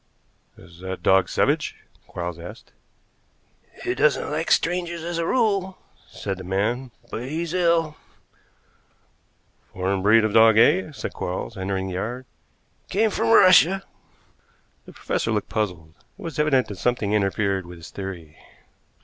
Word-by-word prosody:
"Is 85 Hz, 0 st, -16 dB
that 95 Hz, 0 st, -6 dB
dog 95 Hz, -2 st, +4 dB
savage?" -, -, 0 dB, 0.3 s
Quarles 85 Hz, -1 st, -5 dB
asked. 85 Hz, +1 st, -11 dB, 1.1 s
"He -, -, -1 dB
doesn't 145 Hz, +3 st, +1 dB
like 155 Hz, +2 st, -2 dB
strangers, 170 Hz, -1 st, 0 dB
as 170 Hz, 0 st, -3 dB
a 165 Hz, -, -1 dB
rule," 200 Hz, -6 st, +1 dB, 0.3 s
said 95 Hz, -1 st, -5 dB
the -, -, -7 dB
man, 110 Hz, +8 st, -1 dB, 0.2 s
"but 120 Hz, +4 st, -5 dB
he's 165 Hz, +2 st, -3 dB
ill." 170 Hz, -3 st, +1 dB, 1.7 s
"Foreign 95 Hz, +1 st, -1 dB
breed 110 Hz, +3 st, +5 dB
of 110 Hz, -1 st, 0 dB
dog, 110 Hz, -1 st, +6 dB
eh?" 155 Hz, +8 st, +4 dB
said 145 Hz, -, -6 dB
Quarles, 90 Hz, +5 st, -4 dB
entering 95 Hz, 0 st, -3 dB
the -, -, -5 dB
yard. 120 Hz, +8 st, -4 dB, 0.6 s
"Came 215 Hz, +3 st, +2 dB
from 115 Hz, -, 0 dB
Russia." 185 Hz, +8 st, +6 dB, 1.0 s
The -, -, -12 dB
professor -, -, -2 dB
looked 105 Hz, -2 st, -2 dB
puzzled. 90 Hz, -7 st, -3 dB, 0.2 s
It -, -, -15 dB
was 160 Hz, -4 st, -6 dB
evident 140 Hz, -4 st, +2 dB
that 100 Hz, -3 st, -7 dB
something 120 Hz, -4 st, 0 dB
interfered 100 Hz, -2 st, 0 dB
with 90 Hz, 0 st, -10 dB
his 85 Hz, -, -12 dB
theory. 85 Hz, -6 st, -8 dB
110 Hz, 140 wpm, -23 LUFS, -, 1.7 s, dog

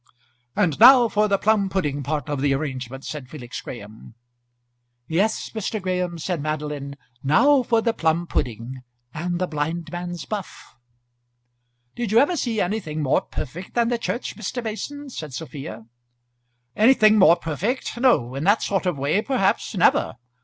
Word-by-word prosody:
"And 165 Hz, -3 st, +1 dB
now 245 Hz, +1 st, +9 dB
for 210 Hz, -1 st, +1 dB
the 200 Hz, -1 st, +2 dB
plum 205 Hz, -1 st, +2 dB
pudding 150 Hz, -7 st, -1 dB
part 150 Hz, +2 st, -3 dB
of 145 Hz, -3 st, -2 dB
the 140 Hz, -1 st, +2 dB
arrangement," 135 Hz, -2 st, -5 dB
said 145 Hz, -5 st, -6 dB
Felix 125 Hz, -4 st, -7 dB
Graham. 110 Hz, -1 st, -10 dB, 0.9 s
"Yes, 195 Hz, +7 st, 0 dB
Mr. 220 Hz, 0 st, -3 dB
Graham," 180 Hz, -2 st, -2 dB
said 165 Hz, 0 st, -3 dB
Madeline, 150 Hz, -2 st, -4 dB, 0.3 s
"now 265 Hz, -, +4 dB
for 230 Hz, -2 st, +1 dB
the 230 Hz, -, +1 dB
plum 165 Hz, -3 st, 0 dB
pudding 125 Hz, -3 st, -3 dB, 0.3 s
and 175 Hz, +3 st, -2 dB
the 185 Hz, -, 0 dB
blindman's 170 Hz, +2 st, -4 dB
buff." 205 Hz, -4 st, -7 dB, 1.2 s
"Did 240 Hz, -4 st, -3 dB
you 220 Hz, -, +4 dB
ever 290 Hz, +8 st, +4 dB
see 235 Hz, -8 st, -1 dB
anything 175 Hz, -6 st, -2 dB
more 135 Hz, -, +2 dB
perfect 170 Hz, +7 st, -7 dB
than 235 Hz, -1 st, +2 dB
the 240 Hz, -1 st, 0 dB
church, 240 Hz, -, -3 dB
Mr. 225 Hz, +3 st, -4 dB
Mason?" 280 Hz, +6 st, -5 dB
said 150 Hz, -, -7 dB
Sophia. 140 Hz, -7 st, -7 dB, 0.9 s
"Anything 215 Hz, -2 st, +5 dB
more 175 Hz, -3 st, +7 dB
perfect? 180 Hz, -, -3 dB
no; 235 Hz, -, +3 dB
in 135 Hz, +2 st, -4 dB
that 205 Hz, +5 st, +3 dB
sort 195 Hz, -2 st, 0 dB
of 175 Hz, -5 st, 0 dB
way, 145 Hz, +9 st, +1 dB
perhaps, 245 Hz, -6 st, 0 dB
never. -, -, +3 dB
175 Hz, 155 wpm, -23 LUFS, 145-220 Hz, 1.2 s, now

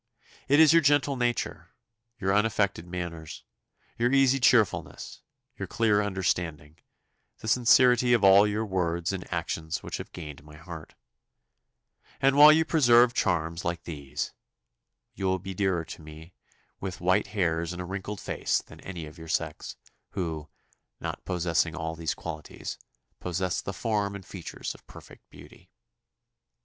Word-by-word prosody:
It 145 Hz, +2 st, +4 dB
is 160 Hz, 0 st, +7 dB
your 165 Hz, -, +6 dB
gentle 145 Hz, -1 st, +3 dB
nature, 120 Hz, -1 st, -2 dB, 0.4 s
your 95 Hz, 0 st, +1 dB
unaffected 105 Hz, -4 st, +1 dB
manners, 85 Hz, -3 st, -6 dB, 0.6 s
your 120 Hz, +1 st, +2 dB
easy 135 Hz, -1 st, +4 dB
cheerfulness, 120 Hz, -5 st, +1 dB, 0.4 s
your -, -, -4 dB
clear 105 Hz, -3 st, +2 dB
understanding, 85 Hz, -6 st, -2 dB, 0.6 s
the -, -, -9 dB
sincerity 125 Hz, +1 st, +5 dB
of 115 Hz, -4 st, +3 dB
all 100 Hz, +2 st, +7 dB
your 105 Hz, +2 st, -1 dB
words 85 Hz, -3 st, -1 dB
and 95 Hz, -2 st, -6 dB
actions 85 Hz, -1 st, -3 dB
which -, -, -4 dB
have -, -, -8 dB
gained 75 Hz, -4 st, -9 dB
my 75 Hz, 0 st, -14 dB
heart; 85 Hz, -1 st, -10 dB, 1.2 s
and 135 Hz, +1 st, +3 dB
while 150 Hz, +1 st, +10 dB
you 160 Hz, +1 st, +4 dB
preserve 120 Hz, -6 st, +5 dB
charms 85 Hz, -4 st, 0 dB
like 85 Hz, 0 st, -3 dB
these, 75 Hz, -2 st, -5 dB, 0.8 s
you 95 Hz, -, -5 dB
will 95 Hz, 0 st, +2 dB
be 95 Hz, +1 st, -7 dB
dearer 95 Hz, -3 st, 0 dB
to -, -, -9 dB
me 80 Hz, +2 st, -12 dB, 0.5 s
with 95 Hz, -1 st, -5 dB
white 90 Hz, +1 st, +2 dB
hairs 85 Hz, -4 st, -1 dB
and 90 Hz, -, -7 dB
a 90 Hz, -, -4 dB
wrinkled 95 Hz, +2 st, -5 dB
face -, -, -1 dB
than -, -, -14 dB
any 90 Hz, -4 st, -7 dB
of 75 Hz, +3 st, -12 dB
your 80 Hz, -, -10 dB
sex, 80 Hz, -, -3 dB, 0.4 s
who, 80 Hz, -4 st, -4 dB, 0.5 s
not -, -, -5 dB
possessing 85 Hz, -2 st, 0 dB
all 80 Hz, -1 st, -3 dB
these 80 Hz, -1 st, -2 dB
qualities, 80 Hz, -3 st, -7 dB, 0.4 s
possess 90 Hz, 0 st, -2 dB
the -, -, -5 dB
form 105 Hz, -3 st, -1 dB
and 100 Hz, -2 st, -9 dB
features 90 Hz, -4 st, -6 dB
of -, -, -19 dB
perfect -, -, -15 dB
beauty. -, -, -16 dB
95 Hz, 150 wpm, -27 LUFS, 85-110 Hz, 1.2 s, while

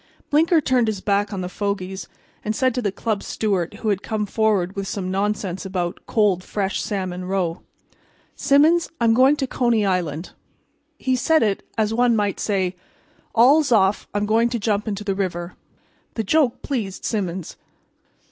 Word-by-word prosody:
Blinker 325 Hz, +3 st, +4 dB
turned 255 Hz, -5 st, +2 dB
his 215 Hz, -3 st, -1 dB
back 200 Hz, +1 st, 0 dB
on 195 Hz, -2 st, -3 dB
the 180 Hz, -, -3 dB
fogies, 190 Hz, -1 st, -3 dB, 0.4 s
and 215 Hz, +1 st, -2 dB
said 255 Hz, +1 st, +2 dB
to 250 Hz, -, -1 dB
the 205 Hz, -4 st, 0 dB
club 210 Hz, 0 st, -2 dB
steward 195 Hz, -4 st, -1 dB
who 215 Hz, +1 st, -3 dB
had 200 Hz, -2 st, 0 dB
come 215 Hz, -2 st, -2 dB
forward 205 Hz, -4 st, +1 dB
with 195 Hz, -1 st, -3 dB
some 185 Hz, -2 st, -3 dB
nonsense 195 Hz, -2 st, -1 dB
about 185 Hz, -2 st, -3 dB
cold 200 Hz, -5 st, +2 dB
fresh 195 Hz, -1 st, -2 dB
salmon 185 Hz, -3 st, -3 dB
roe: 185 Hz, -3 st, -1 dB, 0.7 s
"Symons, 300 Hz, +5 st, +4 dB
I'm 230 Hz, -1 st, +4 dB
going 260 Hz, +5 st, +5 dB
to 280 Hz, -, -1 dB
Coney 240 Hz, -4 st, +1 dB
Island." 175 Hz, -4 st, -1 dB, 0.7 s
He 260 Hz, -1 st, 0 dB
said 315 Hz, +4 st, +3 dB
it 205 Hz, -3 st, 0 dB, 0.2 s
as 220 Hz, 0 st, +1 dB
one 240 Hz, 0 st, +3 dB
might 205 Hz, -2 st, 0 dB
say: 190 Hz, -3 st, 0 dB, 0.6 s
"All's 270 Hz, +5 st, +5 dB
off; 200 Hz, -3 st, +3 dB
I'm 205 Hz, 0 st, -1 dB
going 225 Hz, +3 st, +3 dB
to 240 Hz, -, -1 dB
jump 210 Hz, -1 st, -1 dB
into 210 Hz, -1 st, -3 dB
the 200 Hz, -1 st, -1 dB
river." 180 Hz, -2 st, -3 dB, 0.6 s
The 225 Hz, -, -1 dB
joke 270 Hz, +2 st, +1 dB
pleased 220 Hz, -9 st, -3 dB
Symons. 190 Hz, -5 st, -3 dB
205 Hz, 165 wpm, -22 LUFS, 190-235 Hz, 0.7 s, going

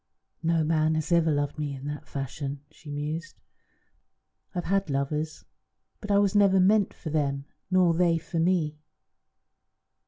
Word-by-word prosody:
"No 165 Hz, 0 st, +2 dB
man 155 Hz, 0 st, +2 dB
has 155 Hz, +2 st, -2 dB
ever 170 Hz, -1 st, +4 dB
loved 145 Hz, 0 st, -1 dB
me 145 Hz, -2 st, -2 dB
in 135 Hz, +1 st, -9 dB
that 145 Hz, 0 st, -5 dB
fashion," 140 Hz, +1 st, -5 dB
she 155 Hz, -1 st, -14 dB
mused. 150 Hz, +3 st, -4 dB, 1.2 s
"I've 175 Hz, -, -1 dB
had 195 Hz, -1 st, +1 dB
lovers, 150 Hz, +3 st, -2 dB, 0.5 s
but 205 Hz, -, -8 dB
I 200 Hz, -, +4 dB
was 200 Hz, -1 st, +3 dB
never 200 Hz, -2 st, +5 dB
meant 200 Hz, +2 st, +4 dB
for 155 Hz, -, -7 dB
them 140 Hz, -2 st, 0 dB, 0.2 s
nor 185 Hz, -2 st, +4 dB
they 170 Hz, 0 st, +3 dB
for 165 Hz, +1 st, -4 dB
me. 165 Hz, -3 st, +1 dB
160 Hz, 150 wpm, -27 LUFS, 145-180 Hz, 1.2 s, never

